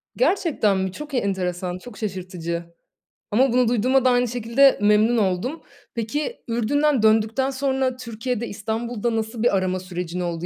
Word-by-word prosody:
Gerçekten 325 - +2
mi? 190 0 -1
Çok 300 +7 -9
enteresan, 180 -5 -1
çok 215 +4 -12
şaşırtıcı 180 -4 -4 0.7
ama 250 +4 +3
bunu 250 -2 +3
duyduğuma 255 +3 +2
da 255 - +6
aynı 245 0 +3
şekilde 245 +4 +3
memnun 210 +3 +4
oldum. 205 - -1 0.3
Peki, 290 - -2
Ürdün'den 255 +3 +1
döndükten 220 +4 +3
sonra 265 -1 0
Türkiye'de, 235 -1 -4
İstanbul'da 225 +2 -3
nasıl 220 +1 -3
bir 240 -5 +3
arama 185 0 -1
sürecin 180 -1 -5
oldu? 175 -1 -3
225 Hz, 145 wpm, -23 LUFS, 190-255 Hz, 0.7 s, da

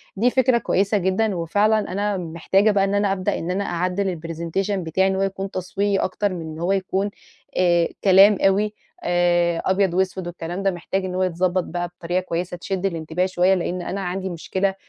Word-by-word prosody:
دي 225 +5 +3
فكرة 255 -1 +3
كويسة 200 -2 +1
جدًا، 195 +2 +1
وفعلًا 205 +6 +2
أنا 205 +1 -1
محتاجة 180 +5 +1
بقى 200 -1 +2
إن 195 +1 0
أنا 205 -1 +2
أبدأ 185 -1 -1
إن 170 - -3
أنا 195 +2 -1
أعدّل 180 0 -1
الpresentation 170 +4 -3
بتاعي 190 -1 +1
إن 190 - 0
هو 190 - -1
يكُون 195 0 -2
تصويري 195 +2 -1
أكتر 195 +1 -1
من 175 - -5
إن 160 -1 -7
هو 175 +3 0
يكُون، 195 +1 0 0.5
آآ 175 -2 +3 0.2
كلام 195 +1 +7
أوي 205 +2 +2 0.3
آآ 175 -1 +2
أبيض 190 -1 +2
وأسود 185 0 -1
والكلام 175 +2 -5
ده، 195 - +3
محتاج 185 +2 -3
إن 180 -1 -4
هو 185 - +1
يتضبط 185 0 0
بقى 175 +1 -3
بطريقة 175 +1 -3
كويسة 180 0 -4
تشد 190 +2 -3
الانتباه 165 -1 -1
شوية 185 0 +2
لإن 180 0 -2
أنا 195 +3 -4
عندي 190 +1 -3
مشكلة، 190 +3 -2
185 Hz, 190 wpm, -22 LUFS, 175-195 Hz, 0.5 s, كلام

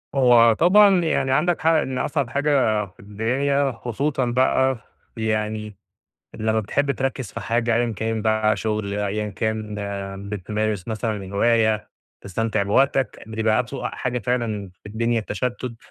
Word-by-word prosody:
هو 120 -3 +6
طبعًا 190 - +5
يعني 145 -4 +1
عندك 155 +6 +2
حق 160 - +3
إن 145 -5 +1
أصعب 140 -2 -1
حاجة 130 -7 +1
في 95 0 -21
الدنيا 130 +7 0
خصوصًا 130 +3 -2
بقى 130 +1 +2 0.4
يعني 110 -1 -2 0.6
لمّا 110 0 0
بتحب 140 +7 0
تركز 135 -4 -3
في - - -5
حاجة 115 0 0
أيًا 120 -1 +1
كان 110 0 -2
بقى، 110 -1 +2
شغل 105 -2 -2
أيًا 105 +1 -2
كان 110 +1 -3 0.5
بتمارس 105 0 -3
مثلًا 110 0 -2
الهواية 110 +2 +1 0.3
تستمتع 110 +2 -1
بوقتك، 135 +6 +1
بتبقى 110 +2 +1
أسوأ 135 +3 -5
حاجة 125 -1 -3
فعلًا 110 -4 -2
في - - -10
الدنيا 115 +2 0
التشتُّت، 120 +2 -4
115 Hz, 135 wpm, -23 LUFS, 110-130 Hz, 0.6 s, هو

